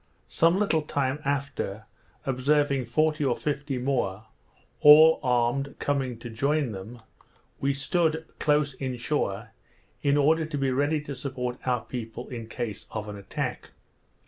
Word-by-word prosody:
Some 165 +3 +3
little 195 -6 +2
time 140 -2 -1
after, 140 -7 -2 0.4
observing 140 0 +1
forty 155 +5 +1
or 130 -4 +2
fifty 145 -2 -2
more, 120 -6 -1 0.5
all 155 +2 +8
armed, 125 +3 +1
coming 135 -4 -1
to 120 +1 -8
join 140 +3 0
them, 110 +4 -9 0.6
we 140 0 0
stood 160 +2 0
close 150 -1 +2
in 130 -1 -4
shore, 115 -4 -2 0.5
in 140 0 +3
order 155 +2 +3
to 155 -2 -4
be 135 -1 +1
ready 145 +4 +1
to 145 -1 -6
support 125 -2 -4
our 125 -2 +1
people 120 0 -6
in 115 -3 -6
case 115 -3 -5
of 110 -1 -5
an 105 - -6
attack. 100 -1 -4
135 Hz, 145 wpm, -27 LUFS, 120-150 Hz, 0.6 s, all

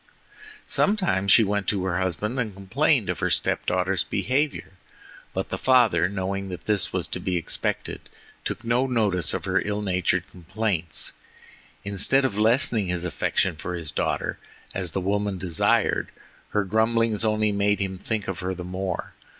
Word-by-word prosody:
Sometimes 175 - +2
she 115 - +7
went 100 -1 -1
to 95 -3 0
her 90 -1 0
husband 100 +7 -1
and 110 -5 -2
complained 95 -1 +1
of - - -2
her - - 0
step - - 0
daughter's 95 +1 +1
behavior, 140 0 -1 0.6
but - - -3
the - - -3
father 120 -9 +4
knowing 95 0 -3
that 90 - -7
this 105 -2 +1
was - - 0
to - - -3
be 90 -2 -1
expected, 85 - -3 0.3
took - - -4
no 120 +3 +1
notice 105 - +2
of - - -3
her - - +1
ill 105 0 -2
natured 90 -2 0
complaints. 90 -1 -2 0.7
Instead 100 +7 +3
of 125 - -1
lessening 110 -1 +3
his 90 0 -2
affection 90 +1 0
for 90 +3 -5
his 85 -4 -4
daughter, - - -2 0.3
as 90 -4 -3
the 95 - -1
woman 100 +1 -1
desired, 85 -3 +1 0.4
her 105 - +1
grumblings 110 +1 +1
only 110 -1 +2
made 100 0 +1
him 95 -2 -3
think 110 0 -3
of 95 -3 -3
her 95 +1 -2
the 90 - -6
more. 95 +1 -4
100 Hz, 165 wpm, -25 LUFS, 90-110 Hz, 0.7 s, she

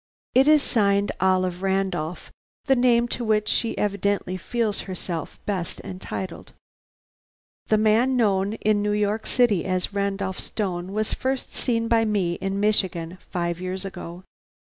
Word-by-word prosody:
It 265 +3 +5
is 305 -2 +6
signed 200 -3 +2
Olive 185 -1 +2
Randolph; 190 -4 -1 0.3
the 270 - +4
name 240 -1 +4
to 240 - -2
which 215 -1 +1
she 230 +2 0
evidently 200 -2 0
feels 220 +3 -1
herself 175 -3 -5
best 185 -5 -3
entitled. 185 -1 -6 1.1
"The 215 - +4
man 225 +5 +3
known 200 -3 +2
in 215 -1 +1
New 205 0 +1
York 210 +1 0
City 235 -8 +3
as 185 +1 -1
Randolph 200 -1 -1
Stone 185 -3 -3
was 215 +1 -1
first 265 0 -2
seen 230 -2 0
by 230 -1 +3
me 200 -6 +1
in 195 0 -1
Michigan 185 -4 0
five 170 -1 -2
years 185 +1 -3
ago. 180 -2 -7
200 Hz, 140 wpm, -24 LUFS, 185-220 Hz, 1.1 s, is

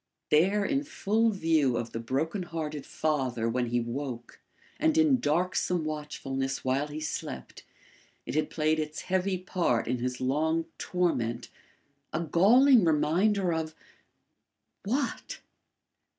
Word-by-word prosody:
There 195 +7 +4
in 280 +3 0
full 225 -6 +1
view 160 - +2
of 115 0 -4
the 115 - -4
broken 145 - -2
hearted 155 -4 -5
father 130 -7 -1
when 120 +1 0
he 120 +1 +1
woke 120 0 -5 0.4
and 315 0 +2
in 305 -5 +4
darksome 175 +1 0
watchfulness 135 -3 -4
while 135 +3 +1
he 150 +1 -6
slept, 155 0 -5 0.6
it - - -5
had 155 +1 0
played 155 0 +1
its 155 0 -4
heavy 190 0 0
part 175 - 0
in 125 +1 -1
his 125 +1 -3
long 160 +5 0
torment 125 -11 -1 0.6
a 155 - -1
galling 225 - +5
reminder 175 +4 +2
of 160 -1 -3 1.1
what? 260 +8 -2
155 Hz, 125 wpm, -28 LUFS, 135-185 Hz, 1.1 s, galling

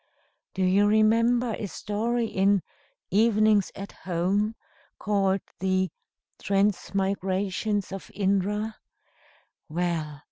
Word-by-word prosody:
Do 190 - 0
you 195 +3 +4
remember 230 +3 +3
a 210 - -3
story 230 +5 -1
in 195 -2 +2 0.5
'Evenings 215 -1 +3
at 195 +1 -7
Home,' 190 +5 -1 0.4
called 195 -2 +1 0.2
the 185 0 +1 0.5
Transmigrations 195 0 0
of 195 0 -7
Indra? 205 +2 0 0.9
Well! 160 -3 -2
200 Hz, 85 wpm, -26 LUFS, 190-215 Hz, 0.9 s, you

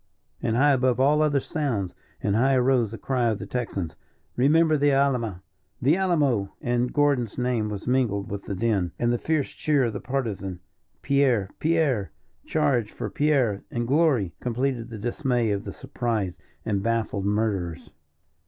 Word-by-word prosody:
And 115 - 0
high 145 +4 +5
above 130 -2 +2
all 145 +3 +4
other 145 -2 +3
sounds, 125 - -2 0.3
and 100 -1 +1
high 130 +4 +3
arose 125 -3 +3
the 115 - -7
cry 125 -2 0
of 110 - -1
the - - -7
Texans 100 -9 -3 0.4
"Remember 155 +4 +4
the 145 0 +3
Alama, 125 -9 +1 0.4
the 140 +6 +3
Alamo?" 145 - +1
and 120 0 0
Gordon's 140 -7 +1
name 125 -4 0
was 100 -2 -6
mingled 115 -5 0
with 100 -1 -5
the 100 - -3
din; 100 -4 0
and 120 0 +1
the 120 - -1
fierce 155 -3 0
cheer 145 -3 +1
of 115 -3 -1
the 100 - -4
Partisan, 105 -9 -3 0.4
"Pierre, 130 -8 +2
Pierre! 150 - +1 0.4
charge 135 -8 +1
for - - -5
Pierre 135 -9 +1
and 120 -1 -2
glory!" 135 - +2
completed 125 -1 -2
the 115 - -7
dismay 120 0 0
of 100 +1 -2
the - - -5
surprised 110 -7 -3 0.3
and 100 -3 0
baffled 110 -3 -1
murderers. 100 -6 -1
120 Hz, 160 wpm, -25 LUFS, 105-140 Hz, 0.4 s, high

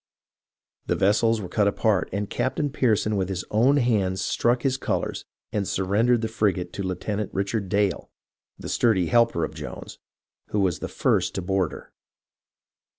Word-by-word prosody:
The - - +1
vessels 110 +3 +3
were 95 - -5
cut 100 +3 +1
apart, 100 -1 +1
and 100 +1 -2
Captain 145 +6 -1
Pearson 110 -6 +1
with 95 -1 -1
his 95 -1 -3
own 125 +7 +4
hands 105 -8 +1
struck 120 +6 +1
his 135 -1 +2
colours 135 - -2 0.3
and 100 -2 -1
surrendered 110 +6 +2
the 115 - -1
frigate 105 -5 -1
to - - -4
Lieuten 95 +2 -3
ant 105 - -3
Richard 100 0 -1
Dale, 100 0 0 0.5
the - - -8
sturdy 95 -8 +2
helper 115 -8 +3
of - - -3
Jones, - - -8 0.5
who 105 - -1
was 95 -4 +1
the - - -4
first - - 0
to 95 - -3
board 95 -3 0
her. - - -11
105 Hz, 165 wpm, -25 LUFS, 95-115 Hz, 0.5 s, own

